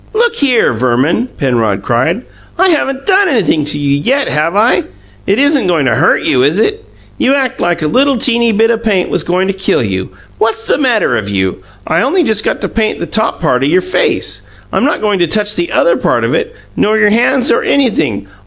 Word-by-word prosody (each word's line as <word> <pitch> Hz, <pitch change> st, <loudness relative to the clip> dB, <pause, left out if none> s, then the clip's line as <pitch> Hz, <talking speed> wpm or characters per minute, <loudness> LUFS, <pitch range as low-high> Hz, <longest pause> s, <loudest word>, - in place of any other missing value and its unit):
"Look 465 Hz, +1 st, +1 dB
here, 255 Hz, -, +2 dB
Verman," 130 Hz, -, 0 dB
Penrod 115 Hz, -, -1 dB
cried. 145 Hz, -, 0 dB, 0.3 s
"I 375 Hz, +2 st, +3 dB
haven't 275 Hz, -4 st, -1 dB
done 390 Hz, 0 st, +3 dB
anything 175 Hz, -, +1 dB
to 150 Hz, 0 st, 0 dB
you 140 Hz, -1 st, 0 dB
yet, 270 Hz, -, 0 dB
have 155 Hz, +4 st, -1 dB
I? 220 Hz, +4 st, +2 dB, 0.4 s
It 200 Hz, -, +2 dB
isn't 280 Hz, -5 st, +2 dB
goin' 165 Hz, -6 st, +1 dB
to 125 Hz, -, +2 dB
hurt 145 Hz, +10 st, +2 dB
you, 125 Hz, -, +1 dB
is 145 Hz, +7 st, +2 dB
it? 425 Hz, -, 0 dB, 0.4 s
You 270 Hz, +2 st, +2 dB
act 265 Hz, -3 st, -2 dB
like 175 Hz, -2 st, -1 dB
a -, -, +1 dB
little 270 Hz, -, +2 dB
teeny 235 Hz, -1 st, +1 dB
bit 225 Hz, +2 st, +2 dB
o' 230 Hz, -, -1 dB
paint 210 Hz, -6 st, -1 dB
was -, -, +1 dB
goin' 180 Hz, +2 st, 0 dB
to 195 Hz, -, -1 dB
kill 190 Hz, -9 st, 0 dB
you. 95 Hz, -3 st, -3 dB, 0.3 s
What's 225 Hz, 0 st, -1 dB
the -, -, 0 dB
matter 235 Hz, -, +1 dB
of 105 Hz, -2 st, -4 dB
you? 95 Hz, -2 st, -2 dB, 0.2 s
I -, -, 0 dB
only 325 Hz, +8 st, +1 dB
just 220 Hz, -5 st, 0 dB
got -, -, -2 dB
to -, -, -1 dB
paint 220 Hz, -1 st, -1 dB
the -, -, -4 dB
top 220 Hz, 0 st, -2 dB
part 135 Hz, -6 st, 0 dB
of 140 Hz, -, +1 dB
your 180 Hz, +4 st, +3 dB
face; 185 Hz, 0 st, -1 dB, 0.3 s
I'm -, -, +1 dB
not -, -, -1 dB
goin' 210 Hz, -3 st, 0 dB
to 175 Hz, -, +2 dB
TOUCH 210 Hz, +4 st, -1 dB
the 345 Hz, -, -2 dB
other -, -, +2 dB
part -, -, 0 dB
of -, -, 0 dB
it 470 Hz, 0 st, -2 dB, 0.2 s
nor 215 Hz, +1 st, +1 dB
your 210 Hz, -1 st, +3 dB
hands 245 Hz, +3 st, +2 dB
or -, -, +2 dB
anything. 155 Hz, -, 0 dB
210 Hz, 220 wpm, -12 LUFS, -, 0.4 s, I